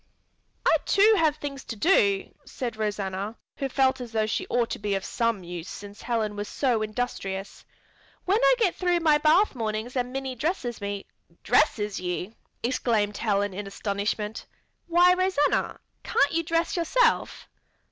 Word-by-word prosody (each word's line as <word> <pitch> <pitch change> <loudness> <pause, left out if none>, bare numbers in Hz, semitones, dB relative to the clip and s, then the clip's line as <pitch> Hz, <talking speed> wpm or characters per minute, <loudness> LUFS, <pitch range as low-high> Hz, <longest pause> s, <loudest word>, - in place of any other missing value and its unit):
"I - - +5
too 420 +3 +5
have 310 -2 +3
things 280 -3 -6
to 230 - -5
do," 205 - +2
said 240 -3 -5
Rosanna, 205 -1 -3 0.2
who 275 - -2
felt 265 0 +2
as 235 -2 -8
though 220 -1 +2
she 215 - -2
ought 240 -1 0
to - - -3
be 205 -1 -1
of 195 -2 -3
some 230 -5 -1
use 175 0 -7
since 205 0 -9
Helen 225 -3 -1
was 205 0 -4
so 245 -6 0
industrious. 210 -3 -4 0.6
"When 395 +4 +3
I - - +6
get 435 -8 +2
through 355 -1 +1
with 340 - 0
my 300 -2 +5
bath 315 +8 +4
mornings 220 0 -3
Minnie 260 +1 -2
dresses 255 - -3
me 200 -1 -4 0.2
" 170 - -33
"Dresses 215 -4 +2
you?" 180 +3 -4 0.3
exclaimed 225 -4 0
Helen 205 -3 0
in 200 +2 -5
astonishment. 210 +2 -3 0.4
"Why, 350 +1 +5
Rosanna, 365 -5 +1 0.2
can't 280 +1 +2
you 330 - +1
dress 330 +1 0
yourself?" 375 +9 +1
235 Hz, 160 wpm, -26 LUFS, 205-295 Hz, 0.6 s, I